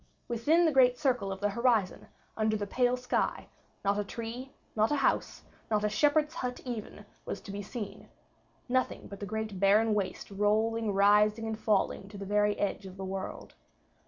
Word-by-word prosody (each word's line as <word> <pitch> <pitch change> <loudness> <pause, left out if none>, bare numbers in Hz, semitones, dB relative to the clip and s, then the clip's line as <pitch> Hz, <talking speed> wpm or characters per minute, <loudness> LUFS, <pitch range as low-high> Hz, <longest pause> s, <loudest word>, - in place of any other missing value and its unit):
Within 295 +9 +3
the 320 - +4
great 250 -3 +5
circle 250 -9 0
of 190 0 -6
the 205 - +2
horizon, 235 -3 +1 0.3
under 215 0 +1
the 205 - -3
pale 250 +4 +1
sky, 250 0 -1 0.4
not 200 +1 +2
a - - 0
tree, 235 +5 -6 0.2
not 215 0 +3
a - - +3
house, 275 - 0 0.3
not 210 -1 +1
a 210 - +2
shepherd's 295 +7 +2
hut 250 -6 -4
even 220 -4 -6 0.2
was - - -5
to 200 - -9
be 200 +1 -4
seen 210 +1 -7 0.6
nothing 255 0 0
but 200 - -9
the 205 - -5
great 215 -2 -4
barren 210 +3 +4
waste 200 -1 -3
rolling, 215 +2 +1
rising 210 +2 +4
and 220 0 -3
falling 200 -2 0
to 205 - -10
the 200 - -6
very 210 +1 +2
edge 200 -1 -2
of 185 0 -11
the 190 - -5
world. 190 0 -6
215 Hz, 185 wpm, -30 LUFS, 200-245 Hz, 0.6 s, great